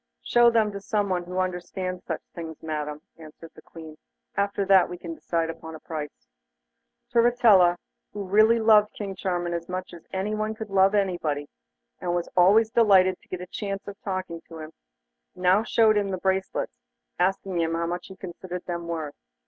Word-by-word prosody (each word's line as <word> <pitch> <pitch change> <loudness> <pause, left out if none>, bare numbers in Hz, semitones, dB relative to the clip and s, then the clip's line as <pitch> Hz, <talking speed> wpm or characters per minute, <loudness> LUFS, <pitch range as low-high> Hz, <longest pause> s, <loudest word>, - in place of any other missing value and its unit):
'Show 240 0 +5
them 225 -2 +2
to 200 0 -7
someone 195 -4 -1
who 180 +1 -6
understands 185 0 -3
such 160 - -4
things, 160 -2 -8
Madam,' 150 -1 -4 0.2
answered 160 +1 -12
the - - -15
Queen; 160 -2 -12 0.4
'after 200 0 0
that 190 -2 +5
we 180 - -6
can 170 -1 -7
decide 165 0 -2
upon 160 0 -10
the 160 - -9
price.' 150 - -7 0.9
Turritella, 230 -7 +5 0.3
who 205 - -5
really 215 +4 +4
loved 215 -1 +5
King 200 -2 -5
Charming 175 -2 -2
as 170 0 -4
much 185 0 -5
as 170 - -11
she 215 +3 -2
could 220 -1 -7
love 195 +1 +4
anybody, 165 -7 -1 0.5
and 175 -1 -1
was 175 -1 -2
always 205 +5 +5
delighted 190 -5 +4
to - - -25
get 180 - -5
a - - -5
chance 195 +1 -5
of 200 - -6
talking 185 -4 -4
to 165 - -9
him, 155 0 -8 0.6
now 180 +3 +3
showed 220 -1 +3
him 200 -1 -2
the 190 - -2
bracelets, 190 +1 -2 0.4
asking 185 -1 0
how 165 +1 0
much 175 +1 -4
he 190 - -11
considered 180 -1 -7
them 170 -1 -4
worth. 160 -4 -4
185 Hz, 175 wpm, -26 LUFS, 170-200 Hz, 0.9 s, Show